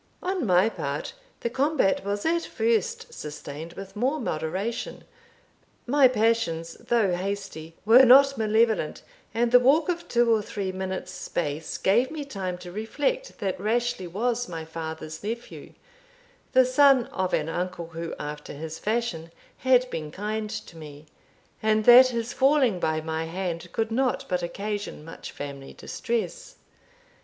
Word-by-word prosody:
On 365 - -1
my 180 +2 +5
part, 145 -8 -4 0.3
the 235 - -1
combat 270 -7 +1
was 205 +1 -3
at 335 +1 +1
first 465 +1 -1
sustained 150 - -7
with 195 +1 -9
more 260 +8 0
moderation. 190 - -3 0.8
My 275 +1 +5
passions, 220 -9 0
though 220 -6 +1
hasty, 185 -4 -5
were 235 +4 +8
not 275 +2 +7
malevolent; 220 -6 +1 0.3
and 235 +2 +1
the 250 - +8
walk 285 +7 +3
of 345 -1 -2
two 235 -1 +3
or 220 - +2
three 200 -2 -4
minutes' 190 0 -4
space 155 -4 -3
gave 235 +7 +3
me 300 -2 -5
time 190 -9 -4
to 180 0 -10
reflect 290 - -2
that 190 -2 -2
Rashleigh 230 -1 -1
was 240 +6 -1
my 165 -2 -5
father's 160 0 -7
nephew, 230 +3 -6 0.8
the 260 0 +6
son 260 -1 +5
of 185 -1 -2
an 155 - 0
uncle, 175 0 -4
who 165 0 -5
after 150 0 -6
his 160 +2 -7
fashion 210 -8 -2 0.3
had 255 -1 +4
been 155 -2 -4
kind 210 +5 -3
to 215 -5 -7
me, 150 -1 -11 0.6
and 215 0 +2
that 250 +2 +10
his 235 -1 -3
falling 265 -8 +3
by 160 -1 0
my 160 0 -3
hand 170 0 -4
could 225 0 -1
not 255 +2 0
but 180 -1 -1
occasion 205 -2 -4
much 165 - -9
family 140 -1 -8
distress. 235 -1 -4
210 Hz, 150 wpm, -26 LUFS, 165-245 Hz, 0.8 s, that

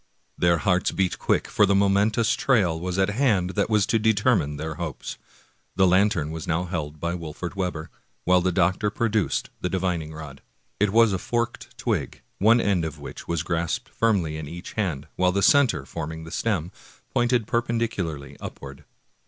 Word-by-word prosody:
Their 85 -1 +3
hearts 90 0 +1
beat 95 -2 -1
quick, - - +1
for 105 - +3
the 100 - +3
momentous 100 +4 +3
trial 100 -13 +2
was 90 +1 -3
at 95 +1 +2
hand 105 -7 +2
that 100 0 0
w^as 105 -3 +3
to 115 - +1
determine 110 - +2
their 80 +1 -4
hopes. 80 -5 -5 0.6
The 95 - +4
lantern 95 -4 +3
was 80 0 -6
now 85 +1 0
held 80 -4 -4
by 85 +2 -2
Wolfert 85 +1 -6
Webber, 90 -5 -3 0.3
while 90 0 +4
the 95 +1 +1
doctor 90 +3 +2
produced 110 -2 0
the 90 - -1
divining 90 -4 -1
rod. 75 -3 -9 0.4
It 105 0 +3
was 115 0 +4
a 95 - -1
forked 120 +4 -3
twig, - - -2 0.2
one 115 +4 +5
end 100 -6 +1
of 80 -2 -4
which 70 - -9
was 85 -2 -1
grasped 85 +9 -2
firmly 95 -9 0
in 80 -1 -6
each 85 +4 -8
hand, 80 -9 -2
while 90 0 +3
the 100 +1 0
center, 120 - +4
forming 80 +3 -6
the 80 - -10
stem, 90 -5 -1 0.4
pointed 120 -2 +2
perpendicularly 105 - -2
up - - -8
ward. 70 -1 -10
90 Hz, 175 wpm, -25 LUFS, 80-105 Hz, 0.6 s, one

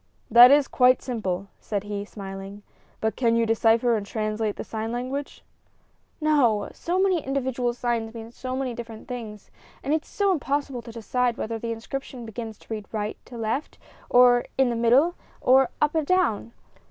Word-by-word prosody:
"That 240 +2 +10
is 285 0 +5
quite 255 0 +4
simple," 200 -6 -3
said 205 -2 -3
he, 205 -1 -4
smiling; 195 0 -8 0.4
"but 220 -1 0
can 230 -3 +2
you 230 0 +3
decipher 225 +1 +3
and 210 - -2
translate 215 0 -2
the - - -5
sign 225 0 -4
language?" 255 +4 -4 0.8
"No; 270 -10 +2
so 350 +2 -2
many 375 -5 +2
individual 260 -2 -1
signs 235 -2 -2
mean 225 0 -8
so 255 +1 -5
many 260 -2 -2
different 230 -2 -9
things, 225 -5 -7 0.3
and 285 - 0
it 315 - +2
is - - -21
so 400 -1 +1
impossible 280 -5 -1
to 230 - -10
decide 240 +1 -1
whether 225 0 -3
the 230 +1 -4
inscription 245 +2 -6
begins 225 -1 -7
to - - -8
read 210 -2 -6
from 220 - -5
right 210 +1 -3
to 240 - -10
left, 230 +6 -3 0.3
or 245 -1 +6
in 265 -2 +3
the - - -2
middle, 245 +9 +4 0.3
or 260 0 +4
up 300 0 +2
or 320 - +2
down!" 290 - 0
235 Hz, 180 wpm, -25 LUFS, 220-265 Hz, 0.8 s, That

